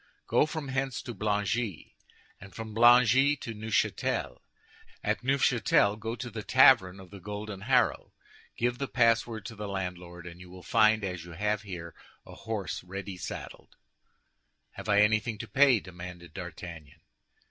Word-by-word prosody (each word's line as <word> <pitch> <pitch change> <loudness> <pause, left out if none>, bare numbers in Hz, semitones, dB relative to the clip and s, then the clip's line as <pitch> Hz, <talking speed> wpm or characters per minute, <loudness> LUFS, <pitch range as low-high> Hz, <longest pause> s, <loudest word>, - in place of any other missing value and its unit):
"Go - - +3
from 150 -3 -5
hence 135 -1 -2
to 120 - -6
Blangy, 105 -1 -2 0.4
and 100 0 -13
from 110 -1 -7
Blangy 120 +4 +6
to 115 - -6
Neufchâtel. 110 0 -1 0.6
At - - -1
Neufchâtel, 120 -5 +2
go 115 +2 -4
to 120 +1 -7
the 110 0 -5
tavern 105 -6 +5
of 95 -1 -13
the 100 - -10
Golden 105 +1 -7
Harrow, 125 +5 +1 0.5
give 120 +1 0
the 140 - -2
password 115 -3 +1
to 115 - -7
the 105 0 -6
landlord, 90 -2 -6
and 90 0 -10
you 90 - -12
will 90 0 -12
find, 110 0 +3
as 90 -3 -4
you 85 0 -11
have 105 +4 -1
here, 90 -5 -8 0.3
a - - -12
horse 110 -4 -5
ready 95 +1 -7
saddled." 90 - -8 1.0
"Have - - -9
I 105 0 +5
anything 110 +1 +2
to - - -7
pay?" 135 -4 +5
demanded 90 -2 -10
D'Artagnan. 85 -4 -9
105 Hz, 155 wpm, -29 LUFS, 90-115 Hz, 1.0 s, Blangy